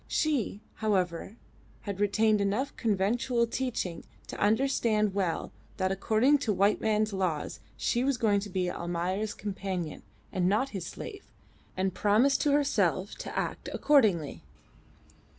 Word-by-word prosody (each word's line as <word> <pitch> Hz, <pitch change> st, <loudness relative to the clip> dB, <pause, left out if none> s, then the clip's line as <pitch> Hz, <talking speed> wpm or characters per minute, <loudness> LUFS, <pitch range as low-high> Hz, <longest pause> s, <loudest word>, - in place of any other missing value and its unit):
She, 270 Hz, -9 st, 0 dB, 0.2 s
however, 190 Hz, -2 st, -1 dB, 0.5 s
had 200 Hz, -2 st, -5 dB
retained 210 Hz, +1 st, +3 dB
enough 210 Hz, +8 st, 0 dB
of -, -, -31 dB
conventual 230 Hz, +3 st, +1 dB
teaching 230 Hz, -8 st, -3 dB, 0.2 s
to -, -, -8 dB
understand 215 Hz, -2 st, +2 dB
well 185 Hz, -4 st, -1 dB, 0.3 s
that 185 Hz, -1 st, 0 dB
according 220 Hz, +9 st, +3 dB
to 240 Hz, -6 st, 0 dB
white 200 Hz, +1 st, +2 dB
men's 215 Hz, -1 st, +1 dB
laws 180 Hz, -6 st, -2 dB, 0.2 s
she 240 Hz, -, +1 dB
was 275 Hz, -1 st, +1 dB
going 210 Hz, -3 st, +3 dB
to 205 Hz, +1 st, -6 dB
be 185 Hz, -1 st, -1 dB
Almayer's 175 Hz, +4 st, -2 dB
companion 190 Hz, -5 st, -4 dB, 0.3 s
and 180 Hz, -1 st, +2 dB
not 220 Hz, +7 st, +1 dB
his 190 Hz, -7 st, -5 dB
slave, 405 Hz, -3 st, -8 dB, 0.5 s
and 190 Hz, 0 st, 0 dB
promised 230 Hz, +7 st, +3 dB
to 295 Hz, -, +2 dB
herself 210 Hz, -, +1 dB
to -, -, -6 dB
act -, -, -3 dB
accordingly. 195 Hz, -, +3 dB
205 Hz, 135 wpm, -29 LUFS, 190-235 Hz, 0.5 s, retained